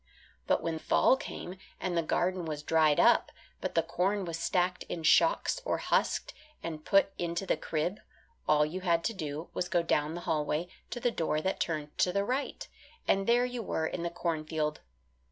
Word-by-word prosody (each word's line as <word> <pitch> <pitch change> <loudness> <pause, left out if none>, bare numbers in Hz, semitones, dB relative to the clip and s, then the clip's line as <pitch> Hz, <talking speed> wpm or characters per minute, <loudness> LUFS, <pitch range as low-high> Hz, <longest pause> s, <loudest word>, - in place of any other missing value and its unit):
But - - +2
when 165 -1 -2
fall 260 - +4
came 185 -7 -7 0.2
and 185 -2 -2
the 170 - +3
garden 180 +2 0
was 150 -2 -4
dried 155 -2 +3
up, - - +5 0.3
but - - -4
the 165 - +4
corn 190 +4 0
was 165 -1 -4
stacked 180 +1 +1
in 165 - -4
shocks - - +4
or - - 0
husked - - 0 0.3
and 155 -2 -5
put 195 +2 +3
into 170 +2 -2
the - - +2
crib, 170 +6 -2 0.5
all 150 0 +5
you 175 +5 -5
had 170 -2 +2
to 230 - 0
do 155 -3 -5
was - - -1
to - - -9
go 175 -2 +2
down 155 -1 +1
the 175 - -5
hallway, 155 +2 -1 0.2
to 245 - -4
the 240 0 +1
door 160 -6 0
that 190 +3 -1
turned 150 -3 -2
to 180 - +4
the 200 +2 0
right, 260 +5 -2 0.4
and 195 0 +2
there 240 +1 +4
you 250 -1 -4
were 160 -6 -1
in 170 - -3
the 170 - -1
cornfield. 155 -3 -2
170 Hz, 195 wpm, -30 LUFS, 155-190 Hz, 0.5 s, up